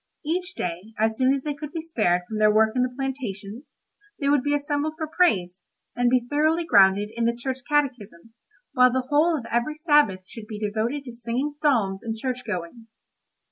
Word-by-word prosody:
Each 360 Hz, +4 st, -2 dB
day, 180 Hz, +5 st, -5 dB
as 220 Hz, +1 st, +1 dB
soon 260 Hz, +2 st, +3 dB
as 275 Hz, -1 st, -1 dB
they 295 Hz, -, -2 dB
could 295 Hz, +1 st, -8 dB
be 325 Hz, 0 st, -5 dB
spared 195 Hz, -, +1 dB
from 215 Hz, +2 st, -4 dB
their 215 Hz, 0 st, +5 dB
work 220 Hz, +1 st, +3 dB
in 250 Hz, -, +2 dB
the 250 Hz, -, +1 dB
plantations, 245 Hz, -3 st, -6 dB, 0.4 s
they 280 Hz, -, 0 dB
would 290 Hz, -2 st, +4 dB
be 290 Hz, +2 st, 0 dB
assembled 290 Hz, +1 st, -2 dB
for 315 Hz, -, -2 dB
praise, 220 Hz, -, +1 dB, 0.4 s
and 245 Hz, 0 st, +2 dB
be 250 Hz, -1 st, +2 dB
thoroughly 310 Hz, +4 st, +1 dB
grounded 200 Hz, -5 st, +4 dB
in 235 Hz, 0 st, 0 dB
the 235 Hz, 0 st, +1 dB
Church 260 Hz, +2 st, -4 dB
Catechism, 235 Hz, -, -2 dB, 0.4 s
while 250 Hz, -2 st, +5 dB
the 255 Hz, 0 st, -1 dB
whole 310 Hz, +3 st, +3 dB
of 245 Hz, -, -7 dB
every 240 Hz, +6 st, 0 dB
Sabbath 295 Hz, -, +2 dB
should 220 Hz, -2 st, -10 dB
be 215 Hz, -, -6 dB
devoted 220 Hz, +7 st, -2 dB
to 250 Hz, -, -8 dB
singing 235 Hz, +5 st, -3 dB
psalms 230 Hz, -11 st, +1 dB
and 225 Hz, -1 st, -4 dB
church 250 Hz, +1 st, -3 dB
going. 210 Hz, +2 st, -6 dB
250 Hz, 195 wpm, -24 LUFS, 215-290 Hz, 0.4 s, their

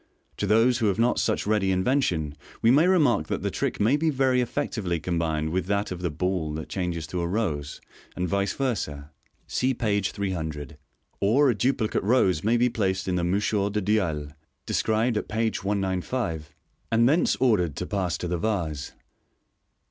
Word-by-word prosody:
To 100 Hz, -, -1 dB
those 115 Hz, +4 st, +4 dB
who 110 Hz, -, +2 dB
have 100 Hz, -, +1 dB
not 120 Hz, +2 st, +2 dB
such 110 Hz, -, 0 dB
ready 105 Hz, -2 st, +2 dB
invention, 90 Hz, -, 0 dB, 0.3 s
we 115 Hz, -, +6 dB
may 150 Hz, +7 st, +5 dB
remark 145 Hz, -, +3 dB
that -, -, -3 dB
the -, -, -1 dB
trick -, -, -2 dB
may 115 Hz, +8 st, +3 dB
be 160 Hz, +2 st, +1 dB
very 130 Hz, -3 st, +2 dB
effectively 110 Hz, -, -2 dB
combined 80 Hz, -2 st, -1 dB
with 90 Hz, 0 st, -1 dB
that 100 Hz, +1 st, 0 dB
of 90 Hz, -1 st, -5 dB
the 90 Hz, -, 0 dB
ball 80 Hz, 0 st, -2 dB
that 80 Hz, -, -6 dB
changes 90 Hz, -4 st, -3 dB
to 85 Hz, +3 st, -3 dB
a 85 Hz, -, -1 dB
rose, 85 Hz, -8 st, -2 dB, 0.4 s
and 90 Hz, -, -1 dB
vice 100 Hz, +3 st, 0 dB
versa 75 Hz, -, -3 dB, 0.3 s
(see 130 Hz, 0 st, 0 dB
page 105 Hz, -4 st, 0 dB
300), 80 Hz, -7 st, -4 dB, 0.4 s
or 130 Hz, +7 st, +4 dB
a -, -, -2 dB
duplicate 120 Hz, -1 st, 0 dB
rose 95 Hz, -7 st, +2 dB
may 115 Hz, +3 st, +3 dB
be 120 Hz, +1 st, +3 dB
placed 95 Hz, -5 st, -1 dB
in 95 Hz, -, 0 dB
the 90 Hz, -1 st, 0 dB
mouchoir 100 Hz, +3 st, +1 dB
du 105 Hz, -, 0 dB
dialle 85 Hz, -8 st, 0 dB, 0.3 s
(described 110 Hz, +1 st, +1 dB
at -, -, -3 dB
page 110 Hz, -2 st, -1 dB
195), 95 Hz, -3 st, -2 dB, 0.4 s
and 115 Hz, +1 st, +4 dB
thence 155 Hz, +6 st, +3 dB
ordered 95 Hz, -, +2 dB
to -, -, -3 dB
pass 90 Hz, -4 st, -1 dB
to 90 Hz, -, -4 dB
the 85 Hz, 0 st, -2 dB
vase. 80 Hz, -9 st, -2 dB
100 Hz, 180 wpm, -26 LUFS, 85-115 Hz, 0.4 s, we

